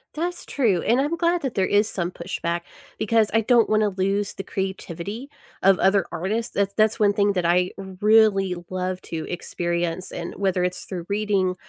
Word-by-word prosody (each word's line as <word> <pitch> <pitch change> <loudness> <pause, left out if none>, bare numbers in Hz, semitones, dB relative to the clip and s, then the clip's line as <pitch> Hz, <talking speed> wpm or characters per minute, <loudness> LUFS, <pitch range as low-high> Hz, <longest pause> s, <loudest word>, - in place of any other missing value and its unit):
That's 350 +3 -3
true, 215 -11 +1
and 240 +4 +2
I'm 300 +4 -1
glad 340 +1 +1
that 265 -4 -3
there 190 - +2
is 205 +3 +2
some 175 -2 -2
pushback 170 -1 -3 0.4
because 220 0 +2
I 225 - +4
don't 230 0 +4
wanna 215 -1 +3
lose 195 +1 -1
the 195 - -6
creativity 195 - -5 0.3
of 195 -1 +5
other 195 -1 +3
artists. 215 +7 -3
That 200 0 -1
that's 215 0 +3
one 205 -1 +4
thing 205 0 +2
that 180 -2 0
I 180 +1 +2
really 195 0 +3
love 185 0 -3
to 160 -2 -5
experience, 175 0 -3
and 170 - -5
whether 190 -2 +1
it's 180 0 -2
through 180 -3 -6
reading 200 -3 +1
195 Hz, 180 wpm, -23 LUFS, 180-215 Hz, 0.4 s, of